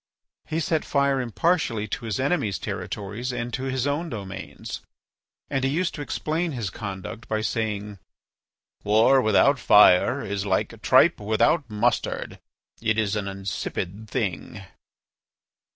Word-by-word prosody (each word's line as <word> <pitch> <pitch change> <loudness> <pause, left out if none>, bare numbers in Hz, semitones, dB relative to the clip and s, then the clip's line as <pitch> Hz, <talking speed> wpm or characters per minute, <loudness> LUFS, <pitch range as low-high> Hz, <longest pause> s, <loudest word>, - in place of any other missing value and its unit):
He 160 - -1
set 160 -1 0
fire 140 -1 +1
impartially 125 -3 0
to 115 - -4
his 110 +2 -2
enemies' 130 - 0
territory 105 +3 -5
and 120 0 -4
to 130 +2 -3
his 130 -1 -1
own 150 +4 -1
domains. 100 -5 -7 0.7
And 135 -1 -1
he 135 - +2
used 170 +5 0
to 150 - -6
explain 160 +3 -2
his 115 -8 -3
conduct 100 +2 -7
by 110 0 -1
saying: 105 -2 -2 0.8
"War 110 +6 +5
without 125 +5 +4
fire 100 -3 +5
is 100 0 -3
like 95 -2 -1
tripe - - +5
without 110 +7 +2
mustard: 115 +3 -1 0.4
it 110 -1 +1
is 110 -2 +1
an 105 -2 -2
insipid 100 +1 -4
thing." - - -3
110 Hz, 135 wpm, -25 LUFS, 105-135 Hz, 0.8 s, War